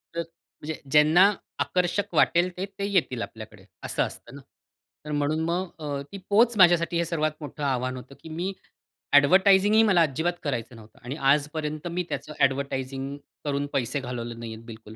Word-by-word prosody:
तर 170 Hz, -, 0 dB
म्हणजे 165 Hz, -1 st, -9 dB
ज्यांना 155 Hz, +7 st, +6 dB, 0.3 s
आकर्षक 180 Hz, +2 st, 0 dB
वाटेल 175 Hz, +1 st, +4 dB
ते, 190 Hz, -, -2 dB
ते 200 Hz, 0 st, -6 dB
येतील 140 Hz, -11 st, +1 dB
आपल्याकडे, 110 Hz, -4 st, -9 dB, 0.2 s
असं -, -, 0 dB
असतं -, -, -8 dB
ना? -, -, -10 dB, 0.6 s
तर 150 Hz, -, -6 dB
म्हणून 145 Hz, +2 st, 0 dB
मग 180 Hz, +2 st, -1 dB
अ, 145 Hz, -2 st, -3 dB
ती 200 Hz, -, -7 dB
पोच 225 Hz, +2 st, +4 dB
माझ्यासाठी 175 Hz, -2 st, +5 dB
हे 170 Hz, -, +1 dB
सर्वात 155 Hz, -2 st, 0 dB
मोठं 145 Hz, 0 st, -7 dB
आव्हान 130 Hz, -2 st, -1 dB
होतं, 130 Hz, +2 st, -11 dB
की 160 Hz, -, -9 dB
मी 175 Hz, +5 st, -3 dB, 0.6 s
ॲडव्हर्टायझिंगही 190 Hz, +8 st, +6 dB
मला 190 Hz, -6 st, +4 dB
अजिबात 160 Hz, +3 st, +1 dB
करायचं 125 Hz, -5 st, -3 dB
नव्हतं 110 Hz, -1 st, -16 dB
आणि 125 Hz, +3 st, -5 dB
आजपर्यंत 150 Hz, +2 st, 0 dB
मी 180 Hz, +1 st, -1 dB
त्याचं 150 Hz, -, -5 dB
ॲडव्हर्टायझिंग 135 Hz, 0 st, -1 dB, 0.3 s
करून 140 Hz, 0 st, -1 dB
पैसे 135 Hz, +1 st, -1 dB
घालवले 120 Hz, -2 st, -5 dB
नाही 115 Hz, -1 st, -7 dB
आहेत 110 Hz, +1 st, -12 dB
बिलकुल, 110 Hz, -1 st, -11 dB
150 Hz, 170 wpm, -26 LUFS, 130-175 Hz, 0.6 s, ज्यांना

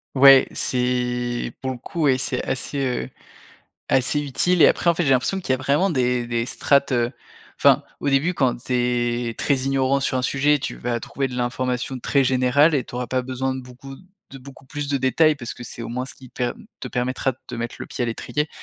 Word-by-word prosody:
Ouais, 135 Hz, 0 st, +8 dB
c'est 125 Hz, -1 st, -1 dB
pour 130 Hz, 0 st, -2 dB
le 130 Hz, -, -6 dB
coup, 160 Hz, +6 st, -4 dB
ouais 130 Hz, -2 st, +4 dB
c'est 130 Hz, -, -2 dB
assez, 135 Hz, +2 st, -3 dB
heu, 125 Hz, -, -2 dB, 0.8 s
assez 135 Hz, +3 st, +2 dB
utile 155 Hz, +5 st, +1 dB
et -, -, +9 dB
après -, -, +1 dB
en 170 Hz, -, +5 dB
fait 175 Hz, -, 0 dB
j'ai 135 Hz, -, +1 dB
l'impression 135 Hz, +9 st, +2 dB
qu'il 175 Hz, -, -8 dB
y -, -, +4 dB
a -, -, -1 dB
vraiment 140 Hz, +9 st, +1 dB
des 125 Hz, -4 st, 0 dB
des 115 Hz, 0 st, -1 dB
strates, 140 Hz, +1 st, +2 dB
heu. 120 Hz, -1 st, +1 dB, 0.5 s
Enfin, -, -, +5 dB, 0.2 s
au -, -, -2 dB
début 145 Hz, +6 st, +2 dB
quand 130 Hz, -5 st, +1 dB
tu 130 Hz, -, -5 dB
es 120 Hz, -1 st, 0 dB
très 140 Hz, -, +1 dB
ignorant 135 Hz, 0 st, +1 dB
sur 135 Hz, -, -1 dB
un 125 Hz, -, 0 dB
sujet, 145 Hz, +3 st, +2 dB
tu -, -, -4 dB
vas 120 Hz, -1 st, -2 dB
trouver 135 Hz, +4 st, -3 dB
de 125 Hz, -, -8 dB
l'information 125 Hz, +1 st, -2 dB
très 140 Hz, +3 st, +2 dB
générale 130 Hz, +5 st, +3 dB
et 130 Hz, -, 0 dB
tu -, -, -12 dB
auras 125 Hz, 0 st, -3 dB
pas 130 Hz, -1 st, 0 dB
besoin 130 Hz, +1 st, -2 dB
de 130 Hz, -, -5 dB
beaucoup 125 Hz, +2 st, -11 dB, 0.3 s
de 135 Hz, -, -9 dB
beaucoup 135 Hz, +1 st, -14 dB
plus 145 Hz, +2 st, -5 dB
de 140 Hz, -, +1 dB
détails 145 Hz, +4 st, +3 dB
parce 120 Hz, -3 st, -7 dB
que 120 Hz, -, -10 dB
c'est 115 Hz, 0 st, -8 dB
au -, -, -6 dB
moins 125 Hz, +2 st, -3 dB
ce -, -, -8 dB
qui 130 Hz, -, -14 dB
per 120 Hz, 0 st, -2 dB, 0.3 s
te -, -, -5 dB
permettra 130 Hz, +2 st, -1 dB
de 125 Hz, -, -23 dB
te -, -, -7 dB
mettre 120 Hz, 0 st, -4 dB
le -, -, -6 dB
pied -, -, -4 dB
à 120 Hz, -, 0 dB
l'étrier. 150 Hz, +6 st, -2 dB
130 Hz, 230 wpm, -22 LUFS, 125-140 Hz, 0.8 s, et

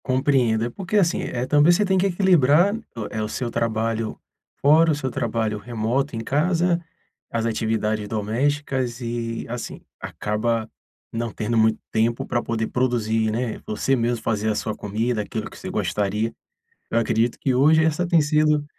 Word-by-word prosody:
Compreendo. 130 Hz, -4 st, +2 dB
É -, -, -2 dB
porque, 190 Hz, -, -2 dB
assim, 175 Hz, -4 st, +2 dB
é, 125 Hz, 0 st, -3 dB
também, 150 Hz, +4 st, +5 dB
você 205 Hz, +4 st, +3 dB
tem 190 Hz, 0 st, +2 dB
que 190 Hz, +2 st, +3 dB
equilibrar, 175 Hz, -1 st, +4 dB, 0.4 s
eh, 110 Hz, -, -3 dB
o 105 Hz, -, -1 dB
seu 120 Hz, 0 st, -3 dB
trabalho 115 Hz, -1 st, -1 dB, 0.4 s
fora, 160 Hz, +3 st, +5 dB
o -, -, +1 dB
seu 130 Hz, -3 st, -3 dB
trabalho 110 Hz, -2 st, -1 dB
remoto 120 Hz, +4 st, -2 dB
em -, -, -3 dB
casa, 170 Hz, +7 st, +1 dB, 0.5 s
as 115 Hz, -1 st, -1 dB
atividades 110 Hz, -2 st, -1 dB
domésticas 125 Hz, +4 st, -1 dB
e, 115 Hz, -1 st, -4 dB
assim, 120 Hz, 0 st, -6 dB, 0.2 s
acaba 110 Hz, +1 st, -2 dB, 0.4 s
não 115 Hz, 0 st, -2 dB
tendo 115 Hz, +2 st, -2 dB
muito 110 Hz, 0 st, +3 dB
tempo 115 Hz, +1 st, +1 dB
pra 120 Hz, -, -1 dB
poder 115 Hz, -1 st, -2 dB
produzir, 115 Hz, -3 st, 0 dB
né, 115 Hz, 0 st, -3 dB
você 135 Hz, +5 st, +1 dB
mesmo 120 Hz, -2 st, -1 dB
fazer 110 Hz, -1 st, 0 dB
a 105 Hz, -, 0 dB
sua 110 Hz, -, -2 dB
comida, 110 Hz, +3 st, -1 dB
aquilo 110 Hz, +1 st, -5 dB
que -, -, -13 dB
você -, -, -7 dB
gostaria. 105 Hz, +2 st, -1 dB, 0.6 s
Eu 115 Hz, -, +3 dB
acredito 115 Hz, +1 st, +1 dB
que 130 Hz, -, +1 dB
hoje 155 Hz, +5 st, +5 dB
essa 160 Hz, +2 st, +1 dB
tem 170 Hz, -1 st, +4 dB
sido 150 Hz, 0 st, +2 dB
120 Hz, 165 wpm, -23 LUFS, 110-145 Hz, 0.6 s, também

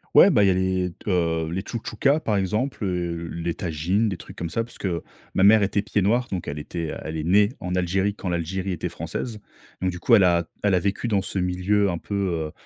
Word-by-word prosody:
Ouais, -, -, +9 dB
bah 105 Hz, -, +4 dB
il -, -, +4 dB
y -, -, +5 dB
a -, -, +4 dB
les 95 Hz, -1 st, 0 dB
t 100 Hz, -, -5 dB
heu, 80 Hz, -3 st, +1 dB
les 95 Hz, +3 st, -2 dB
tchoutchoukas 135 Hz, +7 st, 0 dB
par 105 Hz, -7 st, 0 dB
exemple, 105 Hz, +5 st, -1 dB
heu, 85 Hz, -2 st, -2 dB
les 85 Hz, 0 st, -2 dB
tajines, 90 Hz, +7 st, 0 dB
des 100 Hz, -, -1 dB
trucs 85 Hz, -, -12 dB
comme 85 Hz, -, -3 dB
ça, 115 Hz, -, -1 dB
parce 120 Hz, -, -13 dB
que 85 Hz, -4 st, -2 dB, 0.3 s
ma 95 Hz, -, +2 dB
mère 105 Hz, +2 st, +7 dB
était 100 Hz, 0 st, +1 dB
pied-noir, 105 Hz, +4 st, +1 dB
donc 90 Hz, -3 st, -3 dB
elle 70 Hz, -, -4 dB
était, 80 Hz, +2 st, -4 dB
elle 80 Hz, +1 st, -4 dB
est 80 Hz, -, -3 dB
née 100 Hz, +4 st, +5 dB
en 90 Hz, 0 st, -3 dB
Algérie 95 Hz, +3 st, +1 dB
quand 95 Hz, -, -4 dB
l'Algérie 90 Hz, +3 st, -2 dB
était 90 Hz, 0 st, -3 dB
française. 85 Hz, +7 st, -5 dB, 0.4 s
Donc 95 Hz, 0 st, +1 dB
du 90 Hz, -, -7 dB
coup, 115 Hz, +6 st, +5 dB
elle 100 Hz, -, +6 dB
a 85 Hz, -1 st, +3 dB, 0.2 s
elle 100 Hz, -2 st, +3 dB
a 90 Hz, -, +4 dB
vécu 100 Hz, +5 st, -1 dB
dans 100 Hz, -3 st, +2 dB
ce 95 Hz, -, -5 dB
milieu 95 Hz, +3 st, +1 dB
un 85 Hz, -, -1 dB
peu, 100 Hz, -, -8 dB
heu, 85 Hz, -6 st, -1 dB
95 Hz, 240 wpm, -24 LUFS, 85-100 Hz, 0.4 s, Ouais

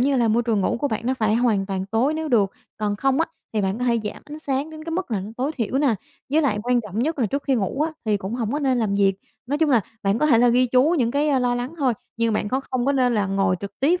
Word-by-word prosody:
như 270 Hz, +2 st, +2 dB
là, 235 Hz, -2 st, +3 dB
môi 230 Hz, +2 st, +2 dB
trường 225 Hz, -4 st, +1 dB
ngủ 230 Hz, -, +1 dB
của 285 Hz, -, +1 dB
bạn 220 Hz, -, -2 dB
nó 260 Hz, -, +1 dB
phải 220 Hz, -3 st, +1 dB
hoàn 225 Hz, -5 st, +2 dB
toàn 190 Hz, -1 st, -3 dB
tối 235 Hz, +9 st, +1 dB
nếu 315 Hz, 0 st, -3 dB
được, 210 Hz, -7 st, +3 dB, 0.3 s
còn 205 Hz, -1 st, -1 dB
không 270 Hz, +5 st, +1 dB
á 330 Hz, -, +2 dB, 0.3 s
thì 215 Hz, -, 0 dB
bạn 195 Hz, +2 st, -1 dB
có 250 Hz, -, -1 dB
thể 235 Hz, -1 st, +2 dB
giảm 210 Hz, -, -5 dB
ánh 295 Hz, +1 st, -9 dB
sáng 285 Hz, 0 st, -2 dB
đến 310 Hz, 0 st, -9 dB
cái 330 Hz, -, -5 dB
mức 350 Hz, -4 st, -3 dB
là 205 Hz, -4 st, 0 dB
nó 200 Hz, -, -7 dB
tối 270 Hz, +5 st, -1 dB
thiểu 240 Hz, +2 st, -1 dB
nè, 275 Hz, -6 st, +3 dB, 0.4 s
với 310 Hz, +3 st, +3 dB
lại 235 Hz, -8 st, +1 dB
quan 245 Hz, 0 st, +2 dB
trọng 210 Hz, -1 st, -6 dB
nhất 305 Hz, +5 st, 0 dB
là 235 Hz, -, +2 dB
trước 280 Hz, +7 st, -2 dB
khi 270 Hz, -, +2 dB
ngủ 225 Hz, +4 st, -1 dB
á 320 Hz, -, -1 dB
thì 215 Hz, -2 st, +2 dB
cũng 200 Hz, +3 st, -5 dB
hổng 230 Hz, -3 st, -2 dB
có 295 Hz, -, 0 dB
nên 265 Hz, -4 st, +1 dB
làm 210 Hz, -4 st, 0 dB
việc. 195 Hz, -1 st, +3 dB, 0.3 s
Nói 290 Hz, +3 st, -1 dB
chung 315 Hz, -3 st, +2 dB
là 240 Hz, -, +5 dB, 0.2 s
bạn 200 Hz, +3 st, +1 dB
có 305 Hz, -, +2 dB
thể 250 Hz, -7 st, +5 dB
là 245 Hz, +1 st, +5 dB
ghi 250 Hz, +2 st, +4 dB
chú 260 Hz, +7 st, +3 dB
những 235 Hz, -2 st, +2 dB
cái, 290 Hz, +3 st, +1 dB
a, 275 Hz, -3 st, +3 dB
lo 245 Hz, -1 st, +1 dB
lắng 245 Hz, +6 st, -4 dB
thôi, 265 Hz, -4 st, +2 dB, 0.2 s
như 230 Hz, 0 st, +1 dB
bạn 210 Hz, -1 st, -1 dB
khó 260 Hz, +4 st, 0 dB
không 255 Hz, 0 st, 0 dB
có 280 Hz, -, +3 dB
nên 250 Hz, -3 st, +2 dB
là 205 Hz, -3 st, +1 dB
ngồi 195 Hz, -1 st, +1 dB
trực 200 Hz, 0 st, -8 dB
tiếp 335 Hz, +7 st, +3 dB
245 Hz, 315 wpm, -23 LUFS, 215-280 Hz, 0.4 s, là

